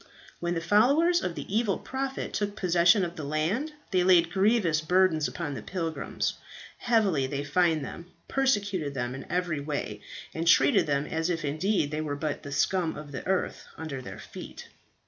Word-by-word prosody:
"When 175 0 -1
the 165 - -1
followers 280 - +4
of 170 - -3
the - - -5
evil 220 -4 +2
prophet 265 0 -4
took 205 -1 -2
possession 180 +1 +4
of 170 0 -7
the 155 - -6
land, 165 - -1 0.2
they 185 -1 +3
laid 175 -2 +5
grievous 195 -6 +2
burdens 165 -2 +3
upon 165 -5 -4
the - - -5
pilgrims, 165 -4 -3 0.5
heavily 200 - +2
they 140 +1 -3
fined 160 0 +2
them, 170 +6 -8 0.2
persecuted 200 - 0
them 120 -1 -2
in 135 - -8
every 175 -4 0
way, 140 -8 -4 0.3
and 165 +1 -3
treated 140 -2 +5
them 140 0 +1
as 160 +2 -1
if 165 -3 -1
indeed 155 +2 0
they 155 0 -2
were 145 -2 -3
but 150 0 -3
the 145 - -8
scum 165 +4 +1
of 150 -1 -9
the 130 - -5
earth 190 -1 -1
under 150 -5 -5
their - - -8
feet. - - -10
170 Hz, 180 wpm, -28 LUFS, 150-195 Hz, 0.5 s, laid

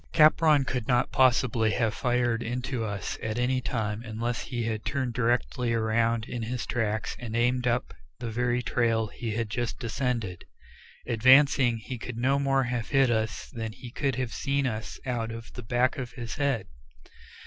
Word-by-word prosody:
Capron 155 -2 +5
could 125 -3 -3
not 125 -1 +2
possibly 125 -3 +3
have 115 -2 +1
fired 120 -2 +1
into 125 +1 -3
us 105 -3 -4
at 110 0 -3
any 125 +1 +1
time, 110 -3 -2
unless 115 +1 -3
he 120 -2 -3
had 110 -1 -2
turned 130 -4 -2
directly 120 0 0
around 115 0 +1
in 120 -1 -5
his 115 +1 -3
tracks 110 -2 -1
and 115 -2 -5
aimed 125 +1 +2
up 120 +1 0 0.2
the 115 -2 -5
very 120 +1 0
trail 115 -2 +1
he 110 0 -5
had 115 0 -1
just 120 +2 -3
descended. 115 -6 -2 0.6
Advancing, 130 +1 +5
he 115 +2 -7
could 120 0 -6
no 135 +4 +2
more 135 -1 +2
have 120 -2 -3
hit 135 -3 +4
us 110 -1 -2
than 110 -3 -4
he 120 +1 -10
could 135 -1 -1
have 125 -2 -3
seen 140 0 0
us 110 -3 -4
out 120 -3 -2
of 115 0 -8
the 125 - -7
back 120 +4 +1
of 125 -2 -5
his 120 0 -6
head. 140 -8 0
120 Hz, 175 wpm, -28 LUFS, 115-125 Hz, 0.6 s, Capron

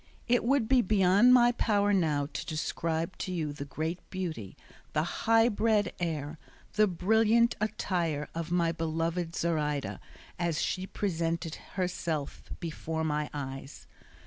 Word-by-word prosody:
It 245 0 +3
would 255 -1 +2
be 260 0 +5
beyond 200 +3 +5
my 240 -1 +7
power 205 -3 +2
now 155 -6 +2
to - - -4
describe 160 +2 -2
to 190 - -3
you 155 -5 -2
the 140 -1 -6
great 160 +5 -3
beauty, 165 - -5 0.4
the 150 - +2
high 225 +6 +3
bred 215 -2 +1
air, 155 -3 -3 0.3
the 215 0 +4
brilliant 220 +6 +3
attire 170 -8 -1
of 165 0 -4
my 170 -2 +2
beloved 165 +1 -2
Zoraida 150 -4 -1 0.4
as 170 -2 0
she 185 0 -1
presented 170 -4 -2 0.2
herself 170 -5 -2 0.2
before 160 -1 -3
my 150 -1 -1
eyes. 135 -1 -7
170 Hz, 135 wpm, -30 LUFS, 155-205 Hz, 0.4 s, my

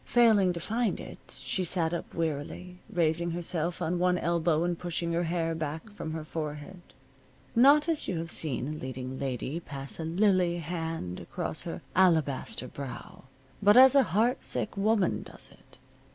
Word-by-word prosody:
Failing 220 -6 +5
to 170 - -5
find 220 +2 -1
it, - - -11
she 135 +8 -2
sat 170 -1 0
up 170 - -5
wearily, 165 +3 -3
raising 170 0 +1
herself 170 0 -2
on 175 +2 0
one 180 0 +3
elbow 170 -1 +1
and 175 -1 -1
pushing 170 -1 -2
her 170 +1 +1
hair 165 -1 -1
back 160 +5 -5
from 160 -6 -6
her 160 -1 -4
forehead 155 +3 -6 0.7
not 285 +6 +6
as 325 -3 0
you 185 - -1
have 165 0 -4
seen 140 -5 -1
a - - -3
leading 130 -1 -6
lady 135 +3 -3
pass 140 -3 -5
a - - -2
lily 180 0 +2
hand 165 - -4
across - - -4
her - - -6
alabaster 160 -8 +2
brow, 130 -2 -8 0.4
but 205 +3 +6
as 260 0 +9
a 280 - +7 0.2
heart 235 +3 +2
sick - - -3
woman 205 -1 +2
does - - -7
it. - - -19
170 Hz, 165 wpm, -29 LUFS, 155-185 Hz, 0.7 s, as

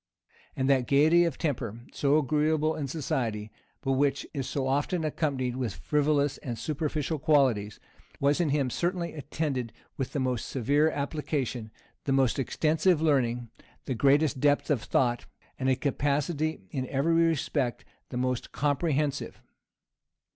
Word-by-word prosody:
And 130 - 0
that 130 -3 +3
gayety 160 +5 +5
of 165 -5 -2
temper, 120 - -3
so 145 +1 +3
agreeable 155 +1 +1
in 145 -3 -3
society, 120 -7 -2 0.3
but 135 - -1
which 140 +1 +1
is 135 -3 -3
so 135 -2 -1
often 145 +6 0
accompanied 135 -5 -1
with 120 -9 -2
frivolous 145 - +1
and 120 -3 -5
superficial 150 +4 -2
qualities, 130 -9 +2 0.4
was 145 +4 +2
in 165 - +1
him 140 -3 +1
certainly 175 +2 -1
attended 140 -5 -3 0.3
with 135 - -3
the 145 - -1
most 125 -3 -1
severe 145 +5 +2
application, 140 -6 -3 0.4
the 140 - 0
most 135 -1 +2
extensive 155 +5 +2
learning, 125 -7 +1 0.3
the 130 - -1
greatest 140 +3 +3
depth 145 +2 +2
of 135 -6 +2
thought, 120 0 0 0.3
and 130 - +1
a 130 - +4
capacity 145 - -1
in 130 -1 -3
every 140 +6 +1
respect 160 -6 +1 0.2
the 125 - -5
most 125 -1 -1
comprehensive. 145 -1 -1
140 Hz, 140 wpm, -28 LUFS, 130-155 Hz, 0.4 s, gayety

